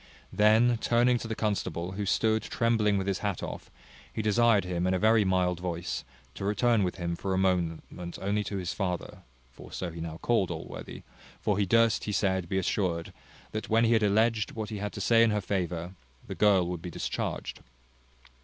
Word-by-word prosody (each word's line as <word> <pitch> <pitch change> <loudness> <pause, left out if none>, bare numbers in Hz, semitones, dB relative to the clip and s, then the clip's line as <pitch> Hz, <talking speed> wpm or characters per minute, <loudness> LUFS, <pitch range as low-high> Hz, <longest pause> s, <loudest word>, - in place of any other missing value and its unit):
Then 110 +3 +4
turning 120 +1 +3
to 115 - -6
the 110 - -3
constable, 100 -5 -2
who 100 +1 -4
stood 110 +2 +2
trembling 110 -3 +1
with 95 - -1
his 100 -1 -1
hat 100 -4 -2
off, - - -6 0.4
he 110 - -3
desired 110 -1 +3
him, 90 0 -1
in 95 - +2
a - - +2
very 110 +2 +4
mild 90 -2 +1
voice, 90 -1 -3 0.3
to - - -7
return 105 +3 +2
with 90 -2 -1
him 85 -2 -3
for 95 +2 -2
a - - 0
moment 90 -4 +1 0.4
only 100 +2 0
to 100 - -3
his 90 -2 -3
father 90 -4 -3 0.3
(for - - -13
so 90 -2 -4
he 80 0 -8
now 80 -1 -5
called 105 -1 +1
Allworthy); 80 -2 -7 0.4
for 105 - 0
he 100 - +1
durst, 115 +2 +3
he 105 - -2
said, 95 -4 0
be 95 - 0
assured, 90 -3 -1 0.4
that, 110 - -5
when 115 +1 +4
he 115 - +3
had 110 - +3
alledged 110 +2 +2
what 110 -2 -4
he 105 - -4
had 105 0 -3
to - - -6
say 115 -1 +4
in 115 - +5
her 105 -1 +1
favour, 90 -3 -3 0.3
the - - -6
girl 100 -4 +4
would 90 -2 -4
be 90 - -6
discharged. - - -4
100 Hz, 200 wpm, -28 LUFS, 90-110 Hz, 0.4 s, in